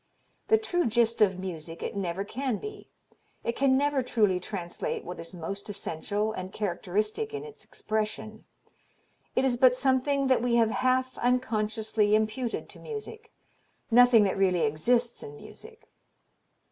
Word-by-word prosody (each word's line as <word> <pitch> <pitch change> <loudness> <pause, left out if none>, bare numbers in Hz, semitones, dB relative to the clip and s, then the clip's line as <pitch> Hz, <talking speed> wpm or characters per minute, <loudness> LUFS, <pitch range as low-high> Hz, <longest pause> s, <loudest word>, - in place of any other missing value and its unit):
The 445 - +5
true 355 - 0
gist 230 0 +2
of 190 -3 +4
music 170 -3 -6
it - - -4
never 190 -1 -2
can 255 +1 -2
be; 425 -1 -9 0.5
it 235 - -1
can 265 -1 +3
never 285 -1 +2
truly 210 -7 +2
translate 180 -2 -4
what 180 - -7
is 165 +2 -8
most 195 +5 -5
essential 205 +2 -2
and 185 -3 -6
characteristic 210 - -2
in 430 - -5
its 445 0 -11
expression. 215 0 -4 0.9
It 265 - +3
is 250 -2 +1
but 250 0 +6
something 270 +2 +1
that 260 -3 +3
we 240 -1 +1
have 225 -2 +4
half 255 +1 0
unconsciously 220 -3 +1
imputed 220 +3 -1
to - - -13
music; 445 0 -8 0.6
nothing 245 -2 +7
that 195 -1 0
really 185 -3 +3
exists 235 +11 +1
in 145 - -9
music." - - -13
220 Hz, 145 wpm, -28 LUFS, 195-260 Hz, 0.9 s, nothing